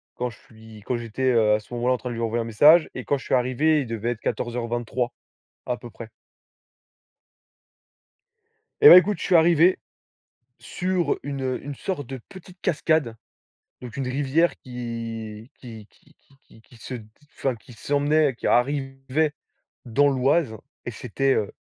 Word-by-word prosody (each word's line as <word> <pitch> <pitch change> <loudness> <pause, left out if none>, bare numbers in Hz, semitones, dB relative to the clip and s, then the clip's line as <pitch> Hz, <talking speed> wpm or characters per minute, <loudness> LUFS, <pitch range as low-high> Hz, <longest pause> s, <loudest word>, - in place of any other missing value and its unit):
quand 125 0 -2
je 115 - -14
suis 110 -1 -15
quand 125 - -1
j'étais, 120 +3 -1
heu, 110 -3 +4
à - - -1
ce 110 +3 -15
moment 120 +1 -2
là 130 - +4
en - - 0
train 125 +2 -6
de 120 - -5
lui 115 - -4
envoyer 115 +1 -1
un - - -4
message, 150 +9 +5
et 130 - -7
quand 145 - +1
je - - -11
suis - - -3
arrivé 135 +5 +2
il 125 - -5
devait 115 +1 -2
être 115 - -5
14:23 120 +1 -3 1.0
à 125 - -2
peu 120 - -11
près. 115 0 -11 2.7
Eh 435 - +11
bah, - - +12
écoute 200 +3 +3
je - - -5
suis 180 - +2
arrivé 170 +2 +5 0.8
sur 180 -4 -1
une 135 -2 -3
une 145 - -5
sorte 155 -2 -4
de 130 +1 -7
petite 185 -1 -14
cascade 155 - 0 0.7
donc 120 -3 -9
une 135 - -3
rivière 145 +6 +1
qui 115 -2 -7
qui 110 -4 -11
qui - - -26
qui 140 - -28
qui 110 - -20
qui 120 - -20
se, 120 +3 -7 0.4
enfin 135 - 0
d - - -11
qui 115 - -17
s'emmenait 145 +3 +1
qui - - -4
arrivait 135 +3 0 0.5
dans 140 +5 +3
l'Oise 135 -2 +1 0.3
et 120 - -4
c'était, 135 +4 -1
heu, 105 - -1
130 Hz, 175 wpm, -24 LUFS, 115-145 Hz, 2.7 s, bah